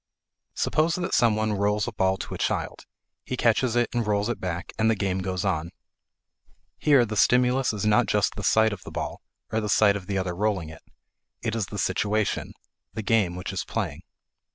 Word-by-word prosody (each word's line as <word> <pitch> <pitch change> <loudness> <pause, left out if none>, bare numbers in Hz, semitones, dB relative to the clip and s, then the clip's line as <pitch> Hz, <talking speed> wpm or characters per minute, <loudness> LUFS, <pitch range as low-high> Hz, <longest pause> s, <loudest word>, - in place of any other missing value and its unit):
Suppose 160 +2 +1
that 175 -1 -3
some 115 -3 +4
one 110 0 0
rolls 105 +1 0
a - - -2
ball 95 -3 +1
to - - -6
a - - -4
child; - - -2 0.4
he 130 - -4
catches 120 +1 +2
it 120 0 +3
and 120 -3 -1
rolls 105 +1 +1
it 120 - -2
back, 85 -2 -4
and 110 +1 +3
the 115 - +3
game 95 -2 -1
goes 95 0 -2
on. 85 -4 -1 1.1
Here 140 -5 +5
the 110 -1 -5
stimulus 125 +4 +3
is 105 -1 -3
not 105 0 +3
just - - +1
the - - -6
sight 110 -1 +3
of 95 - -8
the - - -9
ball, - - -5 0.3
or 110 - 0
the 105 - -3
sight 100 0 +4
of 95 -3 -6
the 100 - -1
other 90 -2 -2
rolling 95 -4 -1
it. 80 - -12 0.6
It 115 -1 -1
is 110 -4 -1
the 105 - -7
situation 105 +1 0 0.4
the 110 - -3
game 100 -5 +2
which 90 - -5
is - - -2
playing. - - -3
105 Hz, 205 wpm, -26 LUFS, 95-115 Hz, 1.1 s, Here